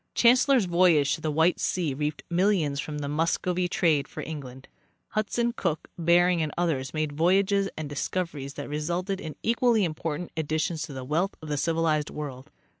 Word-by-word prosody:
Chancellor's 250 -1 +5
voyage 170 -5 +4
to - - -4
the 155 - -1
White 160 +4 +2
sea 170 -6 0
reaped 150 +2 -3
millions 170 -6 +1
from 150 +1 -4
the 145 -1 -3
Muscovy 170 +4 0
trade 155 -5 +2
for - - -7
England. 135 -4 -8 0.4
Hudson, 235 +3 0
Cook, 165 -8 -2
Bering 175 0 +3
and 155 -1 -1
others 155 -7 0
made 155 -1 -1
voyages 195 +5 +2
and 155 -1 -4
discoveries 145 -1 -3
that 145 - -6
re 150 +1 -3
sulted 180 +5 -2
in 155 -2 -6
equally 235 -1 +3
important 165 +1 -4
additions 160 +1 -1
to 145 - -9
the 130 -1 -6
wealth 170 +8 0
of 155 - -9
the 150 - 0
civil 165 +2 0
ized 155 -2 +1
world. 135 -4 -7
160 Hz, 180 wpm, -27 LUFS, 150-180 Hz, 0.4 s, Chancellor's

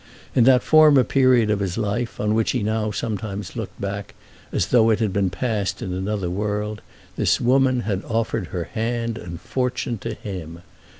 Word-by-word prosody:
In 120 - +4
that 125 -1 +5
former 155 -4 +6
period 130 -5 +3
of 105 - +1
his 95 -3 -2
life, 115 +2 -2
on 105 0 +1
which 110 0 +1
he 125 -5 -1
now 110 0 0
sometimes 105 -3 -4
looked - - -6
back 100 0 -5 0.4
as - - 0
though 115 -2 +5
it 110 - +3
had 110 -4 -1
been 100 -1 +1
passed 100 -1 -2
in 90 - -4
another 95 0 -2
world, 105 +3 -2 0.4
this - - +2
woman 130 0 +3
had 100 -4 -2
offered 110 -5 -1
her 90 -2 -3
hand 115 +2 -3
and 85 -1 -8
fortune 125 -3 -2
to 115 +1 -5
him. 85 -5 -7
110 Hz, 180 wpm, -22 LUFS, 100-120 Hz, 0.4 s, former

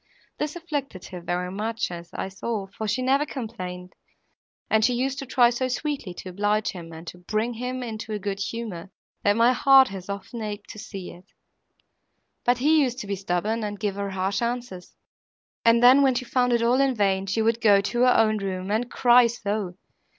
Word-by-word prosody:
This 300 +1 -2
afflicted 290 - -5
her 180 -1 -7
very 180 +1 -2
much, 220 +1 -2
as 170 0 -8
I - - -3
saw, 200 +2 -4
for 200 +3 -6
she 225 +5 0
never 270 +3 +3
complained, 185 -10 -6 0.7
and 220 0 +3
she 245 +2 +3
used 265 +2 -1
to 275 - -6
try 240 -1 +4
so 255 +2 -1
sweetly 270 -5 -3
to 185 - -8
oblige 205 +3 0
him 170 -3 -9
and 160 +1 -10
to 180 - -9
bring 215 +6 -2
him 250 +2 -4
into 225 -1 -6
a 210 - -1
good 200 -1 -4
humour, 200 -4 -5 0.3
that 205 0 +3
my 235 +2 +5
heart 270 0 +6
has 190 -1 -8
often 200 +4 -6
ached 210 -1 -6
to 215 - -10
see 195 -3 -7
it. 180 - -15 1.2
But 245 0 +3
he 305 +4 +4
used 250 -3 0
to - - -7
be 200 0 -2
stubborn, 195 +4 -1
and 205 -1 -4
give 205 -2 -1
her 200 0 -3
harsh 195 +2 -1
answers, 235 -6 -4 0.7
and 230 +1 +5
then, 255 +3 +8
when 265 -2 +3
she 255 +1 -2
found 250 0 +1
it 235 -1 +2
all 245 +3 +3
in 270 -2 +2
vain, 195 -2 +1
she 220 +3 0
would 230 +1 +1
go 205 -3 +6
to 240 +4 -2
her 250 0 +5
own 215 -1 +3
room, 190 0 -4
and 230 +3 0
cry 245 -1 +5
so! 205 -5 -3
220 Hz, 205 wpm, -25 LUFS, 195-245 Hz, 1.2 s, then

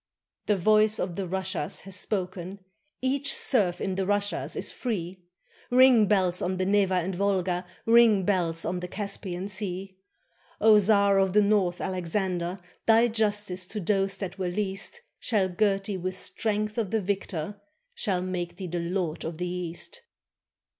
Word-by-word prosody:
The 210 - +3
voice 215 +3 +4
of 180 -2 -3
the 195 -2 -3
Russias 185 -3 -2
has 195 -1 -5
spoken; 185 -1 -3 0.5
Each 275 +2 0
serf 195 -9 +2
in 190 - -2
the 190 0 -2
Russias 205 0 -1
is - - -2
free! 185 -6 -4 0.5
Ring, 250 -4 +6
bells, 185 -3 +2
on 185 +1 -1
the 185 - 0
Neva 195 -1 +2
and 180 +1 0
Volga, 185 -2 0 0.2
Ring, 225 -4 +6
bells, 175 -4 0
on 180 - -1
the 180 - -5
Caspian 195 -2 -4
Sea! 190 -1 -4 0.6
O 215 0 +7
Czar 200 -1 +4
of 190 -1 +2
the 210 - +6
North, 200 -4 +2
Alexander, 180 0 -2 0.3
Thy 230 +1 +5
justice 205 -4 -1
to 215 - -4
those 195 0 0
that 195 -1 -6
were 185 -1 -1
least 200 - -3 0.2
Shall 205 -5 +1
gird 195 +1 +1
thee 200 -2 -3
with 185 +1 -4
strength 215 +1 -2
of 215 -4 -1
the 220 - +1
victor. 200 0 -3 0.3
Shall 190 - -1
make 180 -2 -4
thee 190 - -5
the 175 0 -3
lord 170 -1 -2
of 165 0 -5
the 180 +1 -2
East. 180 - -5
195 Hz, 160 wpm, -27 LUFS, 180-210 Hz, 0.6 s, O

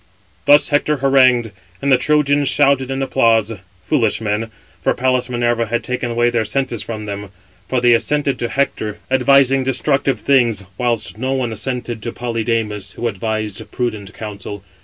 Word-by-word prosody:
Thus 145 0 +6
Hector 150 +1 +1
harangued, 130 -4 +3 0.3
and 140 - 0
the 130 - +6
Trojans 145 -1 +2
shouted 140 -2 +3
in 135 0 -2
applause: 115 -4 +2 0.3
foolish 120 -8 +1
men, 110 +1 -2 0.3
for - - +1
Pallas 130 0 0
Minerva 120 -1 0
had 120 +1 -1
taken 125 0 -3 0.2
their 115 -2 +1
senses 120 +1 -2
away - - -8
from 110 -2 -5
them. 100 -1 -6 0.4
For 130 - +1
they 120 -1 +5
assented 140 +3 0
to 120 - -2
Hector, 110 -6 -1
advising 135 +1 +4
destructive 135 -1 +1
things, 120 -7 +2
whilst 120 -2 -2
no 130 +2 -1
one 130 -3 -1
[assented 120 0 -3
to] 115 - -4
Polydamas, 115 -4 -2
who 120 - -3
advised 110 -1 -4
prudent 110 -5 -3
counsel. 100 -2 -7
120 Hz, 160 wpm, -18 LUFS, 110-135 Hz, 0.4 s, Thus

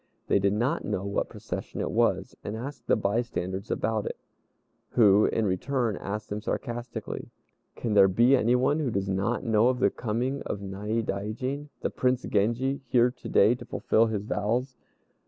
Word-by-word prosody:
They - - +3
did 100 0 +2
not 125 +10 0
know 100 -2 -2
what 100 - -1
procession - - -6
it - - -2
was, - - +1
and 105 +2 -4
asked 135 +5 -7
the - - +4
bystanders 100 -3 -2
about 110 -2 -1
it, - - -4 0.8
who, 105 -3 +6
in 110 - 0
return, 115 +4 0
asked 105 +2 -5
them 105 +1 -3
sarcastically, 120 +1 -4 0.5
"Can 115 - -2
there 100 -2 +7
be 120 +8 +5
anyone 125 +4 +2
who 145 -5 0
does 100 -3 -1
not 100 +6 0
know 115 -1 +3
of 130 0 +2
the 100 - +3
coming 120 +5 -2
of 105 - -4
Naidaijin, 110 +7 -3
the - - -1
Prince 125 0 +1
Genji, 120 +7 0
here 120 0 +4
to 125 - -10
day 105 +4 +5
to 125 0 -7
fulfil 115 -1 +2
his 105 -3 -2
vows?" 120 +6 -1
115 Hz, 170 wpm, -27 LUFS, 100-125 Hz, 0.8 s, there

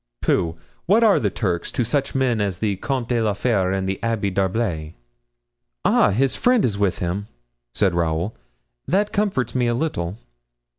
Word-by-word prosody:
"Pooh! 80 -1 +1 0.3
what 215 +6 +5
are 215 -3 +5
the 105 - +1
Turks 90 -4 -2
to 125 - +1
such 140 +4 -1
men 125 -5 +1
as 100 -3 -1
the 105 0 0
Comte 130 +2 -2
de 120 -2 +1
la 110 -2 +1
Fere 100 -4 +1
and 95 0 -1
the 95 0 -2
Abbé 110 -4 -1
d'Herblay?" 95 -5 -1 0.9
"Ah, - - +4
his 125 +7 +1
friend 250 -3 +3
is 105 - 0
with 100 -2 0
him?" 90 +4 -3 0.5
said 95 -4 +2
Raoul. 85 +4 -1 0.5
"That 205 +3 +1
comforts 190 - 0
me 125 -2 +1
a 120 - +1
little." 105 - -2
105 Hz, 170 wpm, -22 LUFS, 95-130 Hz, 0.9 s, what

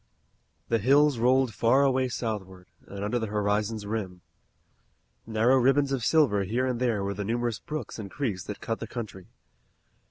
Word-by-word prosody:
The 115 - +2
hills 140 +3 +4
rolled 130 0 +3
far 125 +7 +3
away 130 -1 +2
southward, 95 -6 -5 0.2
and 100 0 -6
under 105 +4 0
the 110 - -3
horizon's 105 +1 -1
rim. 100 -4 -4 1.1
Narrow 115 +4 +3
ribbons 135 +2 +3
of 135 -4 -1
silver 120 -7 +3
here 115 +7 -1
and 125 -2 -1
there 115 -5 0
were 100 0 -2
the 100 +1 -4
numerous 115 +1 -1
brooks 150 -7 -6
and 100 -2 -6
creeks 105 -8 -3
that 105 - -7
cut 115 -1 -3
the - - -6
country. 105 -6 -7
115 Hz, 165 wpm, -27 LUFS, 105-130 Hz, 1.1 s, hills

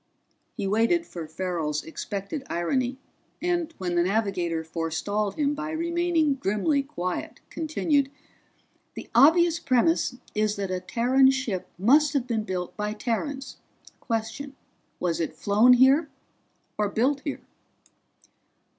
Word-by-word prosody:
He 205 - -2
waited 230 - +2
for 170 - -7
Farrell's 160 -3 -2
expected 200 - -5
irony, 250 +9 -1 0.4
and 345 -2 -1
when 180 -2 -3
the 175 - +3
navigator 180 -4 0
forestalled 165 +6 -2
him 290 -1 +1
by 305 +1 -4
remaining 335 -1 +1
grimly 270 +4 0
quiet, 185 -11 -4
continued. 305 -3 0 0.9
"The - - -9
obvious 330 +7 +5
premise 260 +1 +2 0.2
is 210 0 +1
that 195 -2 -3
a 185 - -1
Terran 255 +6 +3
ship 255 -9 -2
must 285 - +4
have 275 -4 0
been 225 -4 -2
built 180 -2 -4
by 210 0 -2
Terrans. 265 +5 -3 0.4
Question: 230 +5 -4 0.4
Was 170 -2 -1
it 165 - -2
flown 215 +5 +5
here, 270 +5 +5 0.7
or 210 -1 +1
built 265 +7 +1
here?" 290 - -4
235 Hz, 125 wpm, -26 LUFS, 190-285 Hz, 0.9 s, obvious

